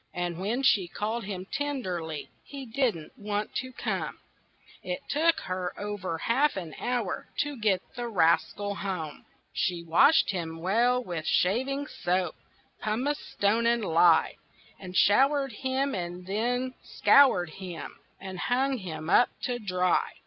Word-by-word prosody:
And 175 -1 -2
when 225 +8 -1
she 200 -9 +4
called 215 +5 -3
him 190 -2 -5
tenderly 185 - -3
He 275 -2 -8
didn't 230 - -1
want 210 0 -3
to 260 -1 -4
come; - - -3 0.6
It 270 - -3
took 325 +3 +2
her 185 -1 -4
over 205 -5 -3
half 270 - +2
an 170 -4 -5
hour 240 -6 -2
To 290 0 -3
get 210 -6 +1
the 240 -1 -3
rascal 200 +1 +2
home. 185 -6 -5 0.3
She 175 -2 -1
washed 170 - +5
him 165 -4 -4
well 235 +8 +2
with 170 -6 -5
shaving 265 +9 +1
soap, 180 - -1 0.5
Pumice 250 +8 -1
stone 220 +3 +2
and 235 -2 +2
lye, 165 -1 +4 0.5
She 180 - -7
showered 270 +8 +4
him 265 +4 -1
and 175 0 -5
she 245 +6 -1
scoured 190 - +4
him 180 -3 -8 0.2
And 190 -1 -7
she - - -2
hung 265 +1 +1
him 160 -5 -6
up 240 +7 +5
to 245 -2 -1
dry. 185 -4 +1
205 Hz, 140 wpm, -28 LUFS, 180-250 Hz, 0.6 s, washed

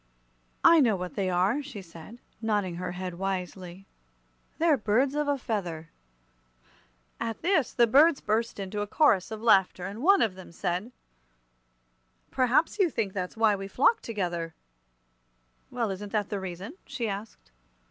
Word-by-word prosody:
"I 335 - +7
know 235 -8 +4
what 180 -1 -5
they 195 -2 -1
are," 185 +10 +1
she 255 -9 -9
said, 170 +6 -12 0.2
nodding 205 -6 -1
her 180 0 -4
head 180 -1 -6
wisely; 185 -1 -4 0.7
"they're 325 -2 +4
birds 250 +4 +1
of 295 0 -1
a 285 -1 +1
feather." 175 - -4 1.3
At 225 +3 -4
this 335 -6 +2
the 235 - +4
birds 285 +6 +5
burst 220 +1 -1
into 200 +1 -4
a 205 - -3
chorus 205 - +3
of 220 0 -7
laughter, 190 -5 +3
and 200 +4 -6
one 390 +6 +5
of 215 - 0
them 185 -2 -12
said: 180 +6 -3 1.4
"Perhaps 265 - +2
you 375 -4 +4
think 205 -9 -2
that's 185 +2 -4
why 220 -2 +4
we 195 0 -6
flock 270 - +3
together." 175 -7 -3 1.1
"Well, 235 -4 -2
isn't 200 +1 -6
that 210 -2 0
the 205 - -2
reason?" 190 - -7
she 250 -5 -3
asked. 205 +2 -7
205 Hz, 155 wpm, -28 LUFS, 185-245 Hz, 1.4 s, I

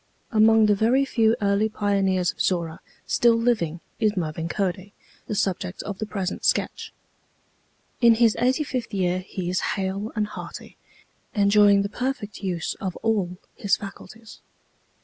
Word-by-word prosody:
Among 220 0 +5
the 210 - +4
very 235 +7 +3
few 225 -4 +2
early 200 +2 +2
pioneers 195 -4 +1
of - - -7
Zorra 170 -3 -1 0.3
still 235 -1 +3
living 215 -9 0 0.2
is 215 -2 +1
Mervin 165 -1 -3
Cody, 195 +1 -2 0.3
the 215 - -3
subject 185 -1 -2
of 200 -2 -6
the 215 - -3
present 195 -3 -4
sketch. - - 0 1.1
In 235 -1 +7
his 230 -1 +4
eighty 255 +5 +2
fifth 250 -6 -4
year 180 -1 +1
he 185 -1 -6
is 185 +1 0 0.2
hale 195 +3 -3
and 215 -1 +1
hearty, 210 - -9 0.6
enjoying 200 -1 +5
the - - -1
perfect 225 -3 -4
use 175 -4 -2
of 185 -2 -3
all 195 -5 0 0.2
his 200 - +1
faculties. 215 +2 -11
205 Hz, 150 wpm, -24 LUFS, 185-220 Hz, 1.1 s, In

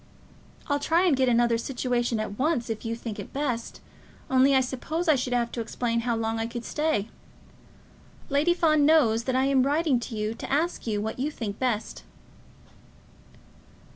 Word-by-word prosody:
I'll 285 -2 0
try 330 +5 +2
and 335 -6 +4
get 260 -1 +2
another 235 -1 +3
situation 240 -2 -1
at 210 0 -5
once 260 -5 0
if 220 - -5
you 230 0 -2
think 230 -2 -6
it - - -8
best, 255 -5 -3 0.5
only 265 +1 +5
I - - +6
suppose 275 +7 -3
I 315 - +6
should 255 -2 -1
have 240 -1 0
to 235 - -3
explain 230 +1 -2
how 235 0 -1
long 225 0 -2
I 225 - -1
could 235 0 -6
stay. 300 -9 0 1.2
Lady 300 +5 +2
Fawn 310 -4 +3
knows 250 -7 +4
that 260 - 0
I 260 +1 +3
am 275 -1 +3
writing 285 0 +2
to 235 -1 -6
you 210 +1 -1
to - - -8
ask 310 -1 0
you 210 -2 -1
what 220 +3 -4
you 280 +4 0
think 220 -8 -6
best." 230 -4 -2
250 Hz, 180 wpm, -26 LUFS, 230-285 Hz, 1.2 s, I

